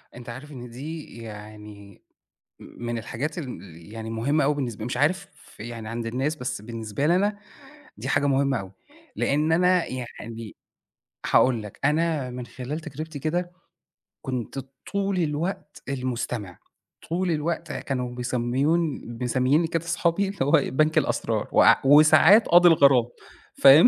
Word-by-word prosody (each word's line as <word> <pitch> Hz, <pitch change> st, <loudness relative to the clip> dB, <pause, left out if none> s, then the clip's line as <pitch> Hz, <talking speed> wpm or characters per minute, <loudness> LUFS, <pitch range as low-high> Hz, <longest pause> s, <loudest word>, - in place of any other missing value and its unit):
أنت 120 Hz, -1 st, -10 dB
عارف 135 Hz, +5 st, -9 dB
إن 125 Hz, -3 st, -9 dB
دي 150 Hz, +3 st, -8 dB
يعني 105 Hz, -2 st, -11 dB, 0.6 s
م -, -, -11 dB
من 120 Hz, -1 st, -2 dB
الحاجات 140 Hz, -, -4 dB
اللي 95 Hz, -, -9 dB
يعني 110 Hz, 0 st, -6 dB
مُهمة 135 Hz, +7 st, +1 dB
أوي 145 Hz, +2 st, +2 dB
بالنسبة 120 Hz, -6 st, -4 dB
مش 125 Hz, +1 st, -3 dB
عارف 185 Hz, +8 st, +1 dB, 0.3 s
يعني 115 Hz, -1 st, -7 dB
عند 115 Hz, 0 st, -4 dB
الناس، 135 Hz, +7 st, -1 dB
بس 125 Hz, -6 st, -4 dB
بالنسبة 115 Hz, +3 st, -3 dB
لي 170 Hz, -, +4 dB
أنا 205 Hz, +2 st, 0 dB, 0.6 s
دي -, -, -6 dB
حاجة 145 Hz, 0 st, +2 dB
مُهمة 135 Hz, -3 st, +2 dB
أوي؛ 95 Hz, -, -9 dB, 0.5 s
لأن 150 Hz, +3 st, +1 dB
أنا 180 Hz, +1 st, +3 dB
يعني، 115 Hz, -3 st, -7 dB, 0.7 s
هاقول 125 Hz, -4 st, +4 dB
لك 105 Hz, -2 st, -10 dB
أنا 150 Hz, -2 st, +1 dB
من 125 Hz, -1 st, -6 dB
خلال 135 Hz, +6 st, -6 dB
تجربتي 155 Hz, +1 st, -7 dB
كده، 175 Hz, +5 st, -2 dB, 0.7 s
كُنت 130 Hz, -1 st, -4 dB, 0.3 s
طول 200 Hz, -1 st, 0 dB
الوقت 155 Hz, 0 st, -3 dB
المستمع، 125 Hz, -7 st, -4 dB, 0.5 s
طول 175 Hz, +2 st, 0 dB
الوقت 165 Hz, +2 st, -2 dB
كانوا 125 Hz, -2 st, -3 dB
بيسمّوني 130 Hz, +6 st, 0 dB
ب 120 Hz, +1 st, -7 dB
مسمّيينّي 130 Hz, +6 st, +2 dB
كده 165 Hz, 0 st, -2 dB
صحابي 175 Hz, +3 st, +1 dB
اللي 200 Hz, -, -9 dB
هو 145 Hz, -, 0 dB, 0.2 s
بنك 155 Hz, +3 st, +2 dB
الأسرار -, -, 0 dB
وع -, -, +6 dB
وساعات 155 Hz, +8 st, +7 dB
قاضي 175 Hz, +1 st, +7 dB
الغرام، 140 Hz, -6 st, +5 dB, 0.6 s
فاهم؟ 140 Hz, -, +9 dB
135 Hz, 145 wpm, -25 LUFS, 120-160 Hz, 0.7 s, فاهم